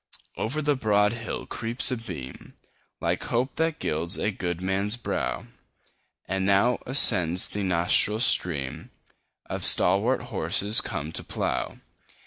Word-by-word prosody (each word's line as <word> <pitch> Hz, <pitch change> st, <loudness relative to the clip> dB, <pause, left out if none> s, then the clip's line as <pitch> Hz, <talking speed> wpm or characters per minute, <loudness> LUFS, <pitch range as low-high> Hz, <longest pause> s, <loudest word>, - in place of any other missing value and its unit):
Over 150 Hz, +8 st, -4 dB
the 145 Hz, 0 st, +1 dB
broad 105 Hz, -3 st, +1 dB
hill 115 Hz, 0 st, -6 dB
creeps 115 Hz, +3 st, +1 dB
a 125 Hz, -, -2 dB
beam, 85 Hz, -, -10 dB, 0.4 s
Like -, -, -3 dB
hope 125 Hz, +3 st, -2 dB
that 160 Hz, -1 st, -1 dB
gilds 85 Hz, -, -2 dB
a 105 Hz, -, -2 dB
good 90 Hz, -3 st, -5 dB
man's 95 Hz, +4 st, -1 dB
brow; 120 Hz, -, -4 dB
10 -, -, -17 dB, 0.8 s
And 95 Hz, 0 st, -2 dB
now 105 Hz, +5 st, +2 dB
ascends 90 Hz, -, +6 dB
the 105 Hz, -, -5 dB
nostril 95 Hz, +3 st, +2 dB
stream 80 Hz, -, 0 dB, 0.6 s
Of -, -, -6 dB
stalwart 100 Hz, +8 st, +3 dB
horses 105 Hz, +4 st, +1 dB
come 75 Hz, +1 st, -6 dB
to -, -, -4 dB
plough. -, -, -4 dB
105 Hz, 135 wpm, -25 LUFS, 90-120 Hz, 0.8 s, ascends